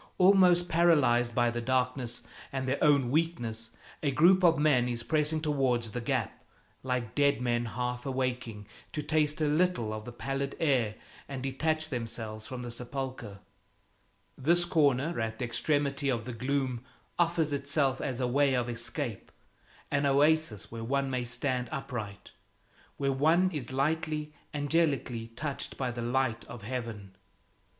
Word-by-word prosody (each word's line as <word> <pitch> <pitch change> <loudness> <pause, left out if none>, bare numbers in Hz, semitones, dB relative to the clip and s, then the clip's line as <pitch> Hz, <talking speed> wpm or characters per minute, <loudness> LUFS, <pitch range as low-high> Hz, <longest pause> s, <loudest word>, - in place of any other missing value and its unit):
Almost 180 -2 +5
paralyzed 145 -9 +3
by 120 -1 +3
the 120 0 -3
darkness 125 0 -1 0.3
and 130 -1 -3
their 135 +2 0
own 140 -5 +4
weakness, 120 -9 -1 0.3
a 145 - +1
group 175 +7 +5
of 165 -2 +6
men 145 -5 +3
is 120 -1 -3
pressing 155 +1 +1
towards 130 -7 +1
the 125 - -3
gap, - - -2 0.4
like 125 -3 -2
dead 140 -1 +3
men 120 -1 0
half 125 +1 -3
awaking, 125 -5 -2 0.3
to 150 - -2
taste 155 -1 +1
a - - +3
little 150 -8 +1
of 110 0 -6
the 120 - -7
pallid 135 +3 -3
air 125 -9 +2 0.3
and 135 -2 -5
detach 155 +4 0
themselves 115 -3 -4
from 130 -3 -6
the 120 - -5
sepulcher. 125 -4 -5 0.9
This 170 +6 +3
corner 155 -3 +2
at 110 0 -3
the 125 - -2
extremity 140 +2 0
of 120 -4 0
the 125 - -5
gloom 130 0 -1 0.4
offers 165 -3 +2
itself 140 -1 0
as 130 -2 -3
a 130 - +1
way 135 +1 +3
of 120 -1 0
escape, 120 -1 -4 0.6
an 145 0 +2
oasis 145 -5 +2
where 115 0 -6
one 135 +3 0
may 125 -1 -1
stand 125 +1 -2
upright, 120 -9 -5 0.7
where 140 -1 +1
one 165 +7 +3
is 140 -7 -5
lightly, 150 +2 -1 0.2
angelically 145 -6 0
touched 145 +1 -4
by 130 -2 -1
the 120 0 -5
light 120 -1 0
of 120 -4 -10
heaven. 110 -5 -5
130 Hz, 150 wpm, -30 LUFS, 120-150 Hz, 0.9 s, of